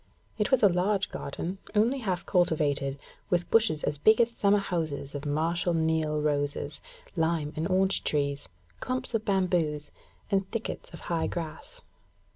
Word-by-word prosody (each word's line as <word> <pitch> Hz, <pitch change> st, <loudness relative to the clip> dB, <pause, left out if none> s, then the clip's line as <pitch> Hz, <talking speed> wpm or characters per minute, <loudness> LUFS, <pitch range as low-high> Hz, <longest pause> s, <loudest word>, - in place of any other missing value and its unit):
It 210 Hz, -, +1 dB
was 265 Hz, -4 st, +3 dB
a -, -, +9 dB
large 190 Hz, +2 st, +1 dB
garden, 175 Hz, +7 st, -5 dB, 0.2 s
only 235 Hz, +6 st, +3 dB
half 185 Hz, -7 st, -2 dB
cultivated, 145 Hz, -6 st, +1 dB, 0.3 s
with 175 Hz, -1 st, 0 dB
bushes 215 Hz, -9 st, +3 dB
as 145 Hz, -, 0 dB
big 220 Hz, +8 st, +5 dB
as 235 Hz, 0 st, +4 dB
summer 205 Hz, -3 st, +3 dB
houses 160 Hz, -8 st, -3 dB
of 145 Hz, +1 st, -5 dB
Marshal 170 Hz, +4 st, 0 dB
Niel 160 Hz, -1 st, +1 dB
roses, 145 Hz, -1 st, -1 dB, 0.3 s
lime 160 Hz, -3 st, 0 dB
and 160 Hz, +1 st, -1 dB
orange 190 Hz, +1 st, +2 dB
trees, 140 Hz, -1 st, 0 dB, 0.3 s
clumps 255 Hz, 0 st, -3 dB
of 220 Hz, -1 st, 0 dB
bamboos, 175 Hz, -7 st, +1 dB, 0.4 s
and 195 Hz, -1 st, +1 dB
thickets 230 Hz, -1 st, -5 dB
of 170 Hz, -, -10 dB
high 165 Hz, -2 st, -1 dB
grass. 170 Hz, -, -6 dB
175 Hz, 150 wpm, -28 LUFS, 150-200 Hz, 0.4 s, a